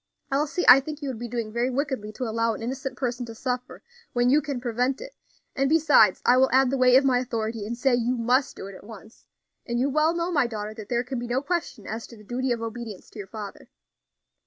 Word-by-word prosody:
Elsie, 295 +5 0
I 250 +2 +10
think 300 +2 -6
you 280 - -2
would 245 -4 -5
be 240 - -4
doing 230 -2 -4
very 240 +2 +1
wickedly 260 -5 -2
to 255 - -5
allow 230 -1 0
an 225 - -8
innocent 260 +1 -4
person 245 -1 -2
to 230 - -8
suffer 250 +1 -4 0.3
when 245 0 +3
you 295 +2 +5
can 275 -3 -4
prevent 250 +2 -1
it; - - -9 0.4
and 275 0 +1
besides, 290 - +5
I 250 - +6
will 265 +1 +5
add 265 0 +4
the 275 - 0
weight 250 0 +6
of 270 +1 +6
my 255 -2 +3
authority, 225 -3 -3
and 235 +2 -4
say 265 +1 +2
you 245 +1 +1
must 250 +4 +1
do - - -8
it 200 - -8
at 190 - -12
once; 220 +1 -13 0.4
and 240 -1 -2
you 275 +3 +1
well 310 +3 +2
know, 340 +1 -1
my 285 -7 +2
daughter, 215 -2 -5
that 215 -2 -10
there 240 0 +1
can 255 0 -4
be 240 - -5
no 250 +3 -1
question 335 - -3
as 225 +1 -5
to 235 - -13
the 210 - -15
duty 250 +4 -2
of 235 -1 -1
obedience 225 -3 -7
to - - -11
your 195 - -6
father." 210 -1 -9
245 Hz, 250 wpm, -25 LUFS, 230-270 Hz, 0.4 s, I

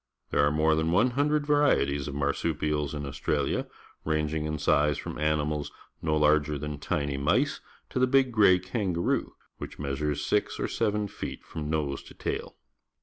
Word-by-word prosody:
There - - +3
arc 75 +1 +2
more 80 +1 +3
than 80 +1 +1
one 115 +8 +3
hundred 145 +3 +1
\'arieties 110 - +2
of 70 - -5
mar 70 0 +1
supials 75 -1 -1
in 75 - -4
AustraUa, 70 +1 -1 0.4
ranging 75 0 -1
in 75 0 -2
size 75 0 +2
from - - -6
animalsjacularger 75 0 0
than 75 0 -5
tiny 70 -3 -1
mice 70 +2 +1 0.3
to - - -1
the 130 - +4
big 130 0 +3
gray 100 -5 +6
kangaroo, 95 -2 -1 0.3
whicli - - -7
measures 75 +1 -2
six 105 - 0
or - - 0
seven 105 0 0
feet - - -7
from 75 -1 -6
nose 75 -3 -1
to - - -14
tail. - - -4
75 Hz, 160 wpm, -28 LUFS, 75-95 Hz, 0.4 s, gray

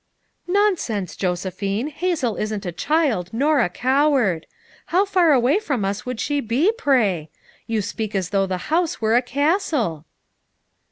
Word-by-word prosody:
"Nonsense, 355 - 0
Josephine. 195 - -2
Hazel 310 - -1
isn't 210 -1 -3
a 175 - -2
child, 255 - 0
nor 285 +5 +2
a 230 - +2
coward. 255 - +1 0.4
How 375 +4 +2
far 365 -5 +3
away 270 - +3
from 270 - -2
us 200 +4 -3
would 250 -3 -4
she 290 +3 0
be, 275 - +2
pray? 225 - +1 0.4
You 220 -2 -1
speak 210 +1 -4
as 185 -3 -1
though 195 -1 +1
the 185 -1 -2 0.2
house 335 -1 +2
•were 220 0 +1
a 245 - +5
castle." 280 - 0
240 Hz, 150 wpm, -22 LUFS, 195-305 Hz, 0.4 s, a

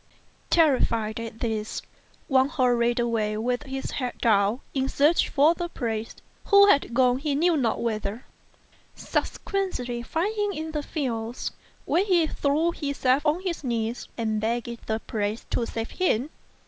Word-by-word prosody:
Terrified 230 -9 +2
at 230 -1 -7
this, 220 -2 -2 0.4
Wang 265 0 +3
hurried 245 -4 +2
away 220 -3 0
with 245 +3 -1
his 270 -2 -5
head 250 -3 -3
down 210 +1 +2
in 270 -1 0
search 300 +4 +3
of 310 +4 +5
the 345 0 -3
priest 225 -6 -4 0.2
who 400 0 +7
had 280 -9 +3
gone 250 0 +4
he 290 0 -1
knew 335 +3 +3
not 245 -7 +1
whither; 220 0 -3 0.7
subsequently 250 - -2
rinding 410 +4 0
him - - -7
in 315 0 -4
the 300 -1 -2
fields, 240 -6 -3 0.3
where 360 - +2
he 360 -5 +3
threw 310 +2 +1
himself 280 -3 0
on 310 +4 +2
his 360 -5 -3
knees 235 -2 -2
and 220 -2 -1
begged 235 +1 -3
the 220 - 0
priest 210 +1 -3
to 235 - 0
save 225 0 -4
him. 300 -6 0
250 Hz, 150 wpm, -26 LUFS, 230-310 Hz, 0.7 s, who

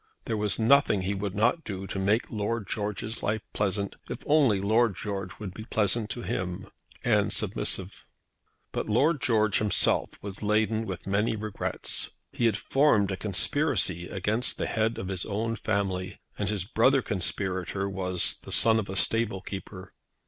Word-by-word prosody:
There 115 - -2
was 105 -1 +1
nothing 115 -4 +4
he 95 +2 -1
would 100 0 -4
not 115 - +2
do 95 -5 -5
to 95 - -4
make 105 +4 +1
Lord 110 -1 -2
George's 105 +2 -4
life 110 +1 -1
pleasant, 100 -1 -1
if - - -6
only 140 -9 +4
Lord 110 +1 +2
George 95 -3 -5
would 100 -3 -7
be 110 - -8
pleasant 110 0 +1
to 120 - -4
him, 90 +1 -3 0.4
and - - +2
submissive. - - +1 0.7
But - - -3
Lord 140 +7 +2
George 110 -4 +2
himself 105 -2 +2
was 100 -1 -8
laden 110 +1 +1
with 95 -3 -6
many 105 +3 0
regrets. 110 -1 -2 0.2
He 120 - -1
had 110 -3 +1
formed 115 -9 +2
a - - -1
conspiracy 95 - +1
against 105 +6 0
the - - -2
head 110 0 0
of 95 - -5
his 95 -2 -2
own 110 +2 -2
family, 95 -3 -2 0.2
and 100 -2 -2
his 105 -4 -1
brother 130 +4 +3
conspirator 95 0 -2
was 95 -2 +1
the - - -11
son 110 -1 +6
of 105 - -5
a 95 - -4
stable 110 -1 +2
keeper. 95 -1 -8
105 Hz, 165 wpm, -27 LUFS, 95-110 Hz, 0.7 s, son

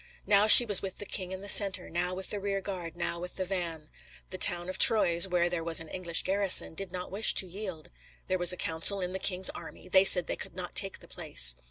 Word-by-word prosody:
"Now 205 +1 +2
she 240 +3 +10
was 205 -4 +5
with 195 -1 -8
the 205 - -8
king 185 -2 -4
in 190 0 -8
the 200 - -10
centre, 195 -2 +6
now 180 +2 -4
with 190 0 -7
the 205 - -5
rear 195 0 -5
guard, 180 -4 -9
now 170 0 -4
with 180 +1 -10
the 190 - -5
van." 170 -5 -6 0.4
The 185 - -9
town 175 0 +1
of 185 0 -8
Troyes, 175 -5 +4
where 175 -2 -2
there 175 -1 -6
was 165 0 -1
an 165 -1 -12
English 170 -2 -2
garrison, 195 -2 +1
did 195 +1 -5
not 180 0 -9
wish 205 +3 0
to - - 0
yield. 185 -3 -10 0.3
There 185 -1 -4
was 175 0 +5
a 180 - -1
council 165 +5 -1
in 180 -1 -6
the 190 - -6
king's 185 -1 -1
army; - - -14
they 190 +1 +2
said 180 -3 +4
they - - -6
could - - -11
not 180 -1 -9
take 195 -1 +1
the - - -17
place. - - 0
185 Hz, 250 wpm, -26 LUFS, 175-195 Hz, 0.4 s, she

